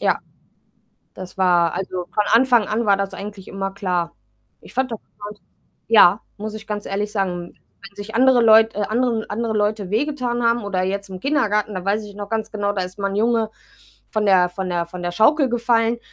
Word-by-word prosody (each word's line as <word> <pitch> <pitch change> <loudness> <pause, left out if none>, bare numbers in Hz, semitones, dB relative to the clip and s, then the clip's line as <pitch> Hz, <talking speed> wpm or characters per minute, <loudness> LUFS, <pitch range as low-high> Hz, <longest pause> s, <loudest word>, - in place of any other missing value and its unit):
Ja, - - +2 1.0
das 185 0 -10
war 175 -3 +3
also, 185 -1 -4
von 210 - +2
Anfang 240 -2 +4
an 225 +2 -1
war 200 -1 +4
das 195 0 -3
eigentlich 200 0 -8
immer 195 0 -4
klar. 180 -4 -2 0.5
Ich - - -15
fand 260 -1 -1
das 225 - -4
interessant, 205 0 -12 0.5
ja, 210 -3 +6 0.2
muss 215 +1 -6
ich 220 0 -9
ganz 210 -1 -4
ehrlich 205 +1 -3
sagen. 180 -4 -3 0.3
Wenn 200 0 -13
sich 210 +2 -7
andere 255 0 +5
Leut 225 0 +6
äh, - - -3
anderen 230 -1 -1
andere 225 +2 -2
Leute 210 -2 -1
wehgetan 245 +1 -1
haben, 235 0 +1
oder 190 -2 -1
jetzt 200 +1 -3
im 185 -1 -7
Kindergarten, 210 -6 0
da 185 -2 -5
weiß 205 +3 -1
ich 205 -1 -12
noch 205 -1 -7
ganz 220 -1 -2
genau, 205 -2 -1
da 200 -2 -2
ist 180 +2 -9
mal 200 -1 -1
'n - - -4
Junge, 225 0 +1 0.6
von 215 -1 -1
der 185 -3 +5
von 185 +1 -5
der 175 -1 -1
von 175 +1 -9
der 175 - -2
Schaukel 265 - +3
gefallen, 235 -1 +1
210 Hz, 205 wpm, -21 LUFS, 195-225 Hz, 1.0 s, ja